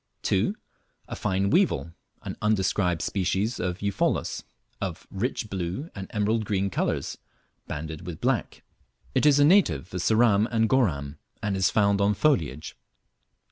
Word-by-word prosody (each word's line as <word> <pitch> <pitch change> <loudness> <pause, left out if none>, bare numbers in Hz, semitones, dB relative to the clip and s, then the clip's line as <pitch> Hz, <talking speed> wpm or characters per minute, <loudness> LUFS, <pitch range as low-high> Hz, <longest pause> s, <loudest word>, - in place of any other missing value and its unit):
2. - - +1 0.5
A - - -4
fine 95 +1 0
weevil, 170 - +2 0.3
(an - - -5
undescribed 95 -4 +1
species 100 +4 -1
of 90 +2 -3
Eupholus,) 100 -1 0 0.4
of 95 -3 -4
rich 110 +3 -2
blue 95 - -4
and 95 -2 -7
emerald 110 +1 0
green 100 -1 -1
colours, - - -2 0.5
banded 80 +3 -6
with 85 -3 -6
black. - - -1 0.5
It - - +3
is 145 -1 +6
a 145 - +6
native 105 - +3
of 90 - -2
Ceram 110 0 +4
and 115 -1 +2
Goram, 75 - 0 0.2
and 105 -2 0
is 95 -1 +2
found 100 -1 +2
on 100 +1 +3
foliage. 80 - 0
100 Hz, 140 wpm, -26 LUFS, 90-110 Hz, 0.5 s, is